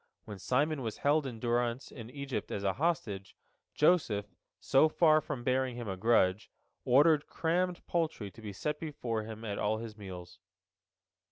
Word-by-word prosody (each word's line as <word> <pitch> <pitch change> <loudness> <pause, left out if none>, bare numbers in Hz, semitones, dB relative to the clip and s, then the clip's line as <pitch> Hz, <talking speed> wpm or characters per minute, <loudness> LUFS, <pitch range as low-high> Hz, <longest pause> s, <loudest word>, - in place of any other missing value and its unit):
When 105 -2 -8
Simon 145 - +1
was 110 -3 -4
held 145 0 +3
in 120 -3 -7
durance 120 +2 -1
in 115 -3 -9
Egypt 140 0 -4
as 100 - -3
a 95 -1 +1
hostage, 115 - -2 0.4
Joseph, 150 - +3 0.3
so 145 +4 +4
far 155 -1 +4
from 135 -6 -5
bearing 130 0 +1
him 120 -2 -6
a 95 - -2
grudge, 100 -1 +2 0.4
ordered 145 +3 +5
crammed 175 +2 -1
poultry 160 - -2
to 115 - -14
be 105 -2 -6
set 150 +9 -3
before 120 -8 -3
him 110 0 -8
at 100 -2 -3
all 110 +1 +1
his 110 -1 -7
meals. 90 -4 -9
120 Hz, 165 wpm, -32 LUFS, 105-150 Hz, 0.4 s, ordered